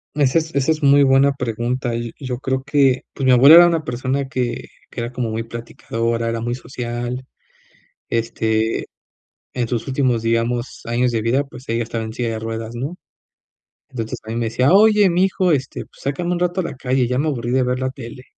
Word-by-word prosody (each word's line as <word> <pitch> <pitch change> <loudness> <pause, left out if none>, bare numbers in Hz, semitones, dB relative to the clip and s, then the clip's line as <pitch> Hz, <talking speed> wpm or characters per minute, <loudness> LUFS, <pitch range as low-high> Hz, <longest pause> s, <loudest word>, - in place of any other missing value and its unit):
Esa 145 +2 +3
es 160 0 -7
esa 140 +2 +2
es 155 - -1
muy 140 0 +6
buena 135 +1 +4
pregunta. 120 0 -2
Yo 120 0 -3
yo 130 -3 -4
creo 130 0 -2
que 140 -2 +2
pues 135 - -3
mi 130 - +5
abuela 135 +5 +8
era 175 0 +9
una 165 -2 0
persona 130 +2 -2
que 125 -2 -3 0.2
que - - -6
era 120 +1 -4
como 125 -2 -3
muy 110 +1 -3
platicadora, 115 0 -3
era 115 0 -2
muy 120 +1 -2
social, 125 0 -5 0.8
este, 110 -1 -1 0.7
en 120 -2 -1
sus 120 +1 -3
últimos, 130 -4 +1
digamos, 115 +2 -1
años 120 +2 +1
de 115 -1 -1
vida. 125 +5 +1
Pues 135 -2 -13
ella 115 +1 0
estaba 115 0 -4
en 110 - -6
silla 120 +1 -2
de 110 - -3
ruedas, 115 +1 -5
¿no? 135 +9 -4 0.9
Entonces, 115 -4 -5
a - - -9
mí 115 - -3
me 120 0 -1
decía: 125 +5 +2
"Oye, 210 -1 +6
mijo, 185 +1 +2
este, 135 -3 -2
pues - - -21
sácame 170 +6 -2
un 175 - -1
rato 180 +1 0
a - - -4
la - - -5
calle. 130 -1 0
Ya 125 +1 -1
me 145 +4 0
aburrí 120 -5 -2
de 130 0 +2
ver 125 0 -1
la 130 0 -1
tele". 125 -1 -10
125 Hz, 210 wpm, -20 LUFS, 115-140 Hz, 0.9 s, era